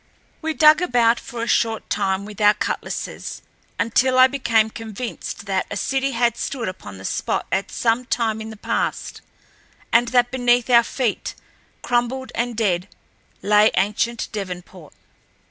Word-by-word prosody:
We 320 -1 -2
dug 310 +1 +6
about 240 -7 +3
for 235 -1 -6
a - - -3
short 225 -2 +1
time 195 -1 -1
with 210 0 -9
our 210 0 +6
cutlasses - - -4 0.4
until 255 +3 +2
I 255 - +9
became 230 -5 +1
convinced 225 -1 -6
that 190 -2 -1
a - - -4
city 270 0 0
had 235 0 +1
stood 250 -5 -3
upon 180 - -8
the 95 - -10
spot - - -1
at 195 +1 0
some 235 +1 0
time 225 -3 -1
in 220 - -6
the 220 - -10
past, - - -3 0.7
and 240 +1 +5
that 245 0 +2
beneath 245 -1 +2
our 235 -1 +8
feet, 240 -2 -2 0.5
crumbled 245 +2 -1
and 240 -1 -2
dead, 190 -4 0 0.6
lay 210 +1 +5
ancient 215 +4 0
Devonport. 180 -5 -7
230 Hz, 150 wpm, -22 LUFS, 210-245 Hz, 0.7 s, I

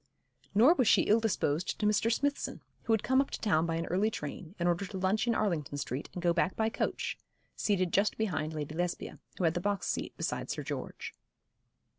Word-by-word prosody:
Nor 245 +10 +7
was 255 -9 +2
she - - +6
ill 215 +2 +4
disposed 175 -7 0
to - - 0
Mr. 210 +2 +3
Smithson, 285 +4 -1 0.2
who 230 - +2
had 220 - +1
come 260 +1 +4
up 275 - -3
to - - -5
town 165 -6 +2
by 165 - -1
an 165 +1 -1
early 195 +5 +1
train, 160 0 -6
in 175 - -1
order 175 +2 +2
to 195 0 -6
lunch 190 +5 +1
in 235 - +2
Arlington 160 -9 -1
Street 140 0 -4
and 180 - -6
go 170 -1 +4
back 175 +1 +1
by 220 0 +1
coach, - - -2 0.4
seated 185 -4 0
just 200 +2 +2
behind 160 -8 -1
Lady 150 0 -4
Lesbia, 175 +2 -3 0.2
who - - -2
had 165 -1 +3
the 175 - -2
box 200 +1 -1
seat - - -3
beside - - -2
Sir - - -3
George. - - -5
190 Hz, 215 wpm, -31 LUFS, 165-220 Hz, 0.4 s, Nor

